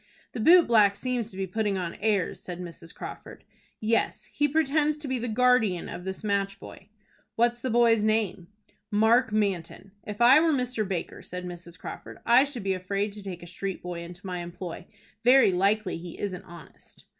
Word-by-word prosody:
"The - - -6
boot 340 +9 +7
black 210 -4 +4
seems 245 0 -2
to 190 - -10
be 195 - -1
putting 205 +1 -1
on 175 -2 -3
airs," 205 -4 0
said 180 -1 -7
Mrs. 170 -2 -8
Crawford. - - -9 0.4
"Yes, 225 +1 -1
he 290 - +2
pretends 300 0 +1
to 300 -1 -7
be 260 -1 -1
the 240 - -3
guardian 225 -6 +2
of 180 - -7
this 190 +2 -5
match 200 -1 -1
boy." - - -12 0.5
"What's 240 +1 +1
the 260 - -2
boy's 230 -2 +4
name?" 210 -5 0 0.4
"Mark 225 +3 +3
Manton." 195 -2 -2
"If 210 0 -7
I 250 +5 +8
were 320 0 +3
Mr. 250 -5 -1
Baker," 185 -3 -4
said 180 0 -7
Mrs. 175 -1 -8
Crawford, - - -9
"I 245 +4 +6
should 265 -7 -6
be 195 -1 +1
afraid 195 +3 -2
to 210 - -8
take 180 -3 -7
a - - -10
street 190 +2 -5
boy 175 -1 -5
into 175 +3 -10
my 180 -1 -4
employ. 175 0 -7 0.4
Very 250 -3 +6
likely 195 +2 +1
he 175 0 -9
isn't 185 -3 -4
honest." 170 -1 -14
205 Hz, 190 wpm, -27 LUFS, 180-240 Hz, 0.5 s, I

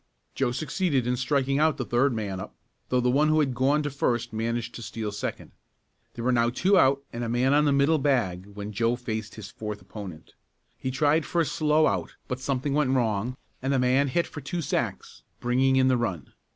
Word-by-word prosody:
Joe 135 -3 0
succeeded 145 0 0
in 125 +1 +1
striking 135 +2 +1
out 155 0 +3
the 130 - -3
third 125 +4 +2
man 105 -5 -3
up, 95 - -8 0.3
though 125 0 +2
the 125 0 +2
one 145 +4 +3
who 155 0 +3
had 140 -4 +1
gone 140 +4 +2
to 145 - -2
first 120 -5 -1
managed 115 +1 -2
to - - -8
steal 110 -2 -4
second. 105 - -5 0.6
There 115 - -5
were 130 - +3
now 120 -1 +3
two 185 +11 +2
out 140 -5 +4
and 120 +1 -3
a 115 - -2
man 125 +3 +2
on 150 +1 +4
the 145 - +3
middle 140 +3 +3
bag 110 -10 0
when 100 +1 -7
Joe 115 +3 +1
faced 110 -3 -5
his 105 -3 -9
fourth 105 -1 -6
opponent. 95 -9 -10 0.4
He 130 - -4
tried 145 +4 +2
for 175 - -1
a - - +1
slow 155 +1 +2
out - - -1
but 125 -1 -3
something 135 +1 -1
went 145 -2 +2
wrong 120 -1 0 0.2
and 135 +1 -1
the 135 - +2
man 130 +2 +3
hit 170 +6 +1
for 145 - -8
two 170 +5 -3
sacks, - - -3 0.2
bringing 130 +2 +2
in 130 0 +4
the 130 -1 +3
run. 95 - -3
130 Hz, 215 wpm, -26 LUFS, 115-140 Hz, 0.6 s, out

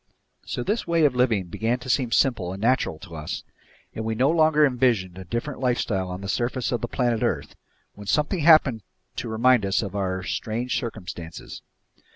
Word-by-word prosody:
So 125 - -3
this 215 - -1
way 165 -2 +3
of 140 - +3
living 120 -6 +2
began 115 +7 -1
to 125 - -11
seem 125 -2 +1
simple 110 -11 +2
and 95 - -7
natural 115 -7 +1
to 85 +1 -11
us, 75 -1 -5 0.5
and 110 - -4
we 110 0 -2
no 130 +6 +3
longer 155 -2 +4
envisioned 120 -9 +1
a 95 - -8
different 120 - -4
lifestyle 120 -7 0
on 90 +1 -6
the 100 - -6
surface 120 +4 -1
of 120 -3 -1
the 120 - -2
planet 120 -2 0
earth, - - -1 0.4
when 105 -1 -11
something 150 - +1
happened 150 -7 +5 0.4
to 120 - -3
remind 120 +1 +3
us 100 +3 +1
of 100 -1 -6
our 95 -2 -2
strange 115 +6 -2
circumstances. 90 -8 -7
120 Hz, 190 wpm, -24 LUFS, 100-130 Hz, 0.5 s, happened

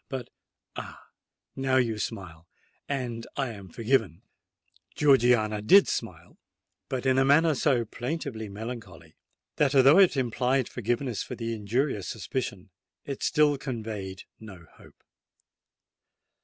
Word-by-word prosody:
But, 130 -3 -6 0.4
ah—now 135 0 -6
you 115 -4 +1
smile—and 115 - -6
I 135 -3 0
am 100 -4 -10
forgiven!" 110 - 0 0.7
Georgiana 120 -7 +3
did 195 - +6
smile—but 130 0 -7
in 130 0 +3
a - - +5
manner 155 +4 +4
so 130 -4 +1
plaintively 120 -3 -5
melancholy, 100 -7 -8 0.4
that, 145 -1 +2
although 135 +6 +7
it 185 -7 +5
implied 125 +1 0
forgiveness 120 0 -2
for - - -6
the 115 -1 -4
injurious 110 0 -1
suspicion, 110 -4 -5 0.3
it 140 -2 -6
still 150 -2 +2
conveyed 110 -8 -5 0.2
no 95 -6 -12
hope! - - -19
120 Hz, 110 wpm, -27 LUFS, 105-135 Hz, 0.7 s, although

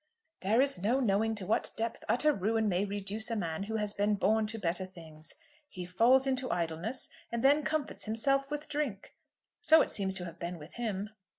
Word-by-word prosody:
"There 215 +6 +3
is 270 -10 +2
no 235 +7 +2
knowing 225 -2 +1
to 200 -3 -5
what 215 - +1
depth 230 0 -3
utter 300 +5 +3
ruin 220 +1 0
may 190 0 +1
reduce 205 +3 -2
a 230 - -1
man 170 -4 -2
who 215 +3 -3
has 210 -1 -1
been 205 +1 +1
born 215 +2 +2
to 225 +1 -5
better 180 -2 0
things. 160 -4 -9 0.3
He 180 -7 -7
falls 235 +9 +4
into 260 -1 0
idleness, 170 +9 -2 0.2
and 235 0 -2
then 285 +3 +5
comforts 310 -1 -1
himself 275 +5 +2
with 295 +1 -4
drink. 285 -10 -3 0.5
So 320 -7 +6
it - - -5
seems 190 -2 0
to 180 -2 -4
have 170 -1 -9
been 175 +1 -4
with 155 +1 -12
him." 215 -3 -3
215 Hz, 200 wpm, -31 LUFS, 190-250 Hz, 0.5 s, So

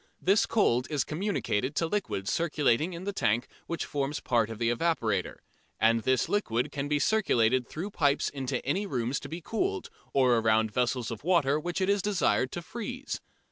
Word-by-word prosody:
This 195 +3 +3
cold 125 - +2
is 145 -3 +1
communicated 145 - -1
to 165 - +1
liquid 165 - -2
circulating 155 -1 +1
in 170 +2 -7
the 200 +1 -3
tank 115 - +1 0.2
which 170 - -3
forms 145 0 -2
a - - -9
part 115 -5 +2
of 115 - -6
the 115 +1 +1
evaporator, 115 - 0 0.4
and 115 +1 +4
this 130 +2 +1
liquid 125 - 0
can 140 0 -3
be 150 0 +1
circulated 130 - +2
through 185 +7 -5
pipes 145 -6 +2
into 135 -2 -3
any 190 +10 0
rooms 125 -4 -1
to - - -9
be 165 +2 -6
cooled 390 - -2 0.2
or 130 -3 +4
around 110 -1 +2
vessels 125 +1 0
of 115 +1 -6
water 155 -5 +3
which 175 +4 -3
it 185 - +2
is 200 0 +2
desired 180 -10 +1
to 175 - -4
freeze. 245 +7 -5
145 Hz, 185 wpm, -29 LUFS, 120-185 Hz, 0.4 s, and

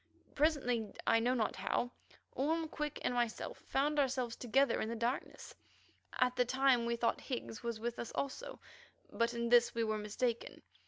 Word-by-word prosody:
Presently, 250 -8 +1
I 225 - +5
know 245 +3 +2
not 225 -3 0
how, 195 +5 -1 0.4
Orme, 320 +4 0
Quick, 300 -1 -4
and - - +1
myself 240 -2 -2
found 290 +2 0
ourselves 255 -4 0
together 255 +1 +2
in 220 - -2
the 230 - -2
darkness; 235 +4 -3 0.6
at 250 0 +3
the 250 - +4
time 260 -1 +3
we 235 - +1
thought 235 0 0
Higgs 240 -4 -5
was 235 -2 -3
with 235 +1 -3
us 235 - -4
also, 485 - -4 0.5
but 235 0 0
in 235 0 -1
this 240 0 +5
we 230 - +1
were 215 -1 0
mistaken. 230 +3 -2
245 Hz, 170 wpm, -35 LUFS, 230-270 Hz, 0.6 s, I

